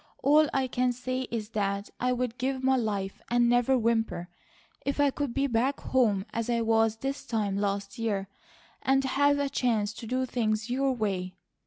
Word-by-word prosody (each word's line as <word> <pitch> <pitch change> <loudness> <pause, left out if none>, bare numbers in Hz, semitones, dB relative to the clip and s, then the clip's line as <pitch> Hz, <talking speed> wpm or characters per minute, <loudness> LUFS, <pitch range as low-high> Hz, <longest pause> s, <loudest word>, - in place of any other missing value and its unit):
All 300 +1 +5
I 270 -1 +1
can 250 0 0
say 255 +1 -3
is 220 -2 -4
that 200 -2 -2
I'd 250 -1 -1
give 260 +1 -1
my 265 0 +4
life 205 -5 -2
and 240 0 +3
never 245 +2 +3
whimper, 225 -6 0 0.5
if 280 +1 -2
I 285 -1 +4
could 285 -2 -2
be 275 +3 0
back 260 +2 +1
home 215 -7 +1
as 230 +1 -2
I 235 -1 +1
was 225 -1 +3
this 270 +5 -4
time 210 -4 -1
last 200 +1 -2
year, 205 -4 -1 0.5
and 270 0 +2
have 285 +2 +3
a 285 0 0
chance 220 -6 0
to 225 +1 -9
do 255 +2 0
things 220 -2 -1
your 270 +2 +1
way. 195 -6 -2
240 Hz, 180 wpm, -28 LUFS, 215-260 Hz, 0.5 s, All